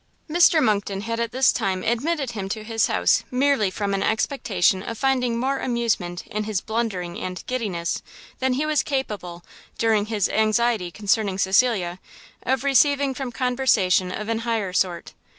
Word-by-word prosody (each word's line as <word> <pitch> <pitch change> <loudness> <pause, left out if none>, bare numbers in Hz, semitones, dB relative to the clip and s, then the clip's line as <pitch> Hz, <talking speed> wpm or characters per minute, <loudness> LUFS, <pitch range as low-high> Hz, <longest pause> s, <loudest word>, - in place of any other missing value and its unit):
Mr 330 -1 +4
Monckton 200 -2 0
had 230 +2 -3
at 235 -1 -1
this 260 +2 +4
time 190 -1 -1
admitted 270 +3 -1
him 200 -4 -5
to 215 +1 -4
his 225 0 +1
house 90 -1 +2
merely 255 -5 +2
from 200 +1 -2
an 195 - 0
expectation 205 -6 +1
of 230 +3 -6
finding 250 -3 +1
more 265 +3 0
amusement 225 -8 -1
in 210 0 -4
his 210 -3 -1
blundering 210 -7 -3
and 180 0 -5
giddiness, 205 -10 -2 0.4
than 260 0 +1
he 285 +4 0
was 305 -2 +2
capable, 205 - -4 0.3
during 220 -2 +2
his 210 -4 0
anxiety 220 -3 +1
concerning 205 0 0
Cecilia, 190 -3 +2 0.4
of 265 +2 0
receiving 280 +1 +3
from 260 -1 -5
conversation 240 -8 +2
of 210 +3 -5
an 225 0 -1
higher 225 -5 -2
sort. 180 -2 -1
220 Hz, 160 wpm, -23 LUFS, 195-255 Hz, 0.4 s, Mr